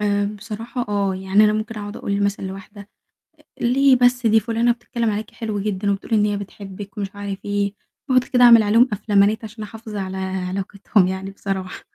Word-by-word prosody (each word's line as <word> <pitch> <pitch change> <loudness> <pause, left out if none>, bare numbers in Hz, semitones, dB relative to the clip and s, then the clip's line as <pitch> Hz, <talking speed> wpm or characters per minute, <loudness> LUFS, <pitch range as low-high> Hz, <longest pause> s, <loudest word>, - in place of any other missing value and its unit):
آآ، 205 -1 +1
بصراحة 225 +3 -5
آه، 200 -2 0
يعني 190 +3 +3
أنا 210 - +4
ممكن 215 +1 -3
أقعُد 205 0 -7
أقول 200 0 -2
مثلًا 200 0 -1
لواحدة 195 +1 -9 0.5
آآ، - - -23 0.2
ليه 265 +2 +4
بس 245 0 +3
دي 220 0 +5
فُلانه 230 +2 +1
بتتكلّم 235 -1 -2
عليكِ 210 +1 -3
حلوة 215 -3 -4
جدًا 200 0 -1
وبتقول 200 +3 -3
إن 210 -1 +4
هي 205 -1 0
بتحبِّك 200 0 -9
ومش 200 -1 -4
عارف 200 -1 -5
إيه، 205 -1 -1 0.4
باقعُد 255 -1 +4
كده 250 0 +2
أعمل 235 -2 +8
عليهم 225 +5 +4
أفلامانات 205 +1 +2
عشان 215 0 -8
أحافظ 220 0 -9
على 190 -1 -4
علاقتهم 190 +1 -1
يعني 190 +1 -4
بصراحة. 195 -2 -5
205 Hz, 185 wpm, -21 LUFS, 195-225 Hz, 0.5 s, أعمل